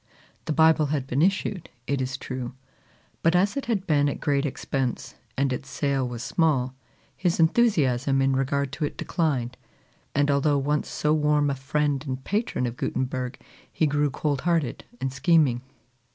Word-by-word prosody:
The -, -, -2 dB
Bible 160 Hz, -1 st, +4 dB
had 140 Hz, -2 st, -1 dB
been 135 Hz, +2 st, 0 dB
issued, 195 Hz, 0 st, 0 dB, 0.2 s
it 140 Hz, -1 st, -1 dB
is 130 Hz, +1 st, -2 dB
true; 130 Hz, -2 st, -5 dB, 0.7 s
but 165 Hz, +2 st, +3 dB
as 195 Hz, +6 st, +3 dB
it 280 Hz, -4 st, -3 dB
had 205 Hz, -5 st, 0 dB
been 145 Hz, -4 st, +3 dB
at -, -, -4 dB
great 145 Hz, -1 st, +1 dB
expense, 135 Hz, -2 st, -3 dB, 0.2 s
and 135 Hz, -1 st, +1 dB
its 135 Hz, +2 st, -6 dB
sale 140 Hz, -3 st, 0 dB
was 120 Hz, -1 st, -5 dB
small, 135 Hz, -3 st, +1 dB, 0.4 s
his 175 Hz, -2 st, 0 dB
enthusiasm 145 Hz, -, +3 dB
in 135 Hz, 0 st, +2 dB
regard 135 Hz, +1 st, 0 dB
to 150 Hz, +1 st, -2 dB
it -, -, -6 dB
declined; 130 Hz, -8 st, -1 dB, 0.6 s
and 145 Hz, +1 st, +3 dB
although 140 Hz, +1 st, +2 dB
once 145 Hz, +2 st, 0 dB
so 150 Hz, 0 st, +1 dB
warm 150 Hz, -1 st, +2 dB
a -, -, -1 dB
friend 140 Hz, +1 st, -1 dB
and 130 Hz, 0 st, -4 dB
patron 205 Hz, -, -1 dB
of 120 Hz, 0 st, -4 dB
Gutenberg, 130 Hz, 0 st, -2 dB, 0.3 s
he 160 Hz, -, +1 dB
grew 145 Hz, 0 st, +1 dB
cold 140 Hz, 0 st, -1 dB
hearted 165 Hz, -6 st, 0 dB
and 135 Hz, -1 st, -2 dB
scheming. 135 Hz, -3 st, +3 dB
140 Hz, 165 wpm, -25 LUFS, 130-155 Hz, 0.7 s, Bible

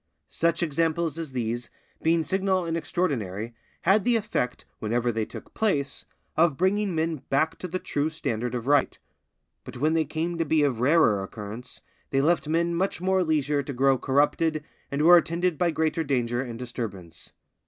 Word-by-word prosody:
Such 170 Hz, 0 st, +1 dB
examples 165 Hz, +1 st, 0 dB
as 160 Hz, -4 st, -5 dB
these, 120 Hz, -1 st, -3 dB, 0.3 s
being 165 Hz, 0 st, +2 dB
signal 190 Hz, 0 st, 0 dB
and 165 Hz, 0 st, -2 dB
extraordinary, 125 Hz, -, -2 dB, 0.3 s
had 195 Hz, +3 st, +4 dB
the 245 Hz, 0 st, +3 dB
effect, 200 Hz, -, -2 dB
whenever 120 Hz, +2 st, 0 dB
they 110 Hz, -1 st, -1 dB
took -, -, -11 dB
place, 150 Hz, -11 st, -1 dB, 0.3 s
of 160 Hz, -3 st, +3 dB
bringing 190 Hz, 0 st, +1 dB
men 160 Hz, 0 st, 0 dB
back 155 Hz, +4 st, +1 dB
to 180 Hz, -, -4 dB
the 180 Hz, +1 st, -2 dB
true 150 Hz, -4 st, -1 dB
standard 125 Hz, -6 st, -3 dB
of 120 Hz, -1 st, -4 dB
right; 145 Hz, 0 st, +2 dB, 0.7 s
but 125 Hz, 0 st, -9 dB
when 155 Hz, +5 st, +2 dB
they 160 Hz, -1 st, +2 dB
came 165 Hz, +3 st, -3 dB
to -, -, +3 dB
be 155 Hz, -1 st, +2 dB
of 130 Hz, -6 st, +1 dB
rarer 125 Hz, -6 st, +4 dB
occurrence, 105 Hz, +5 st, -8 dB, 0.3 s
they 135 Hz, -, +1 dB
left 150 Hz, 0 st, +2 dB
men 170 Hz, +2 st, +1 dB, 0.3 s
more 190 Hz, +1 st, +2 dB
leisure 150 Hz, -3 st, +1 dB
to 140 Hz, +1 st, -6 dB
grow 135 Hz, +1 st, +3 dB
corrupted, 150 Hz, +3 st, +1 dB, 0.3 s
and 140 Hz, +2 st, -1 dB
were 175 Hz, +2 st, +9 dB
attended 170 Hz, -1 st, 0 dB
by 175 Hz, -, +3 dB
greater 160 Hz, 0 st, 0 dB
danger 120 Hz, -4 st, 0 dB
and 120 Hz, -3 st, -6 dB
disturbance. 110 Hz, -9 st, -7 dB
155 Hz, 170 wpm, -26 LUFS, 125-170 Hz, 0.7 s, were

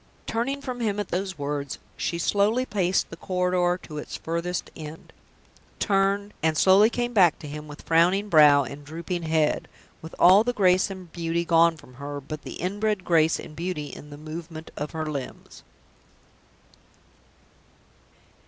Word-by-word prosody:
Turning 260 Hz, +5 st, -2 dB
from 255 Hz, -3 st, -5 dB
him 210 Hz, -3 st, -1 dB
at 205 Hz, -, -3 dB
those 190 Hz, +2 st, -3 dB
words, 145 Hz, -1 st, -3 dB, 0.2 s
she 170 Hz, -, -2 dB
slowly 205 Hz, +8 st, +2 dB
paced 190 Hz, -5 st, 0 dB
the -, -, -6 dB
corridor 180 Hz, 0 st, 0 dB
to 150 Hz, -2 st, -7 dB
its -, -, -7 dB
furthest 170 Hz, +2 st, -3 dB
end; 155 Hz, 0 st, -10 dB, 0.6 s
turned, 200 Hz, 0 st, +1 dB
and 160 Hz, -1 st, +1 dB
slowly 195 Hz, +5 st, +6 dB
came 240 Hz, 0 st, -2 dB
back 180 Hz, -7 st, +5 dB
to 155 Hz, -, -9 dB
him 150 Hz, +1 st, -7 dB
with 145 Hz, 0 st, -11 dB
frowning 180 Hz, +5 st, +3 dB
brow 150 Hz, -5 st, +6 dB
and 140 Hz, +2 st, -8 dB
drooping 170 Hz, +4 st, -5 dB
head 160 Hz, -2 st, +1 dB, 0.3 s
with 160 Hz, -, -10 dB
all 190 Hz, +4 st, +7 dB
the 245 Hz, +1 st, -1 dB
grace 185 Hz, -3 st, +3 dB
and 185 Hz, -3 st, -9 dB
beauty 170 Hz, 0 st, -1 dB
gone 165 Hz, 0 st, +4 dB
from 125 Hz, -, -16 dB
her, 145 Hz, +2 st, -6 dB
but 150 Hz, +2 st, -7 dB
the -, -, -8 dB
inbred 205 Hz, +1 st, -2 dB
grace 165 Hz, -1 st, +3 dB
and 155 Hz, -, -10 dB
beauty 165 Hz, -3 st, -4 dB
in 150 Hz, -, -10 dB
the 145 Hz, -, -10 dB
movement 155 Hz, +1 st, -8 dB
of 150 Hz, +1 st, -4 dB
her 160 Hz, -1 st, -4 dB
limbs. 140 Hz, -4 st, -7 dB
170 Hz, 160 wpm, -25 LUFS, 155-195 Hz, 0.6 s, all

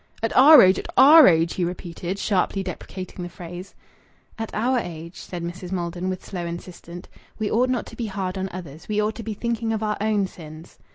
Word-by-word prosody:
"At 225 Hz, -, -1 dB
our 285 Hz, +1 st, +9 dB
age! 185 Hz, 0 st, +4 dB
At -, -, -7 dB
our 300 Hz, +3 st, +9 dB
age!" 165 Hz, -1 st, +3 dB
he 180 Hz, -, -2 dB
repeated, 175 Hz, +1 st, -5 dB
sharply 195 Hz, -1 st, 0 dB
deprecating 185 Hz, 0 st, -7 dB
the 175 Hz, -, -5 dB
phrase. 175 Hz, +2 st, -10 dB, 0.6 s
"At 225 Hz, -, -4 dB
our 245 Hz, +4 st, +1 dB
age," 170 Hz, -2 st, -8 dB
said 175 Hz, -2 st, -7 dB
Mrs. 175 Hz, +1 st, -7 dB
Maldon, 175 Hz, 0 st, -3 dB
with 185 Hz, -1 st, -5 dB
slow 180 Hz, -3 st, -5 dB
insistence, 170 Hz, 0 st, -9 dB, 0.3 s
"we 215 Hz, -2 st, -2 dB
ought 250 Hz, +3 st, +2 dB
not 255 Hz, -2 st, -1 dB
to -, -, -12 dB
be 235 Hz, -, -4 dB
hard 190 Hz, -2 st, -4 dB
on 190 Hz, 0 st, -3 dB
others. 165 Hz, -3 st, -9 dB
We 210 Hz, -1 st, -1 dB
ought 210 Hz, +1 st, 0 dB
to 230 Hz, -, -8 dB
be 215 Hz, -1 st, -5 dB
thinking 230 Hz, 0 st, -2 dB
of 220 Hz, -1 st, -2 dB
our 210 Hz, 0 st, -1 dB
own 210 Hz, -2 st, +1 dB
sins." 160 Hz, -3 st, -12 dB
185 Hz, 210 wpm, -23 LUFS, 175-220 Hz, 0.6 s, our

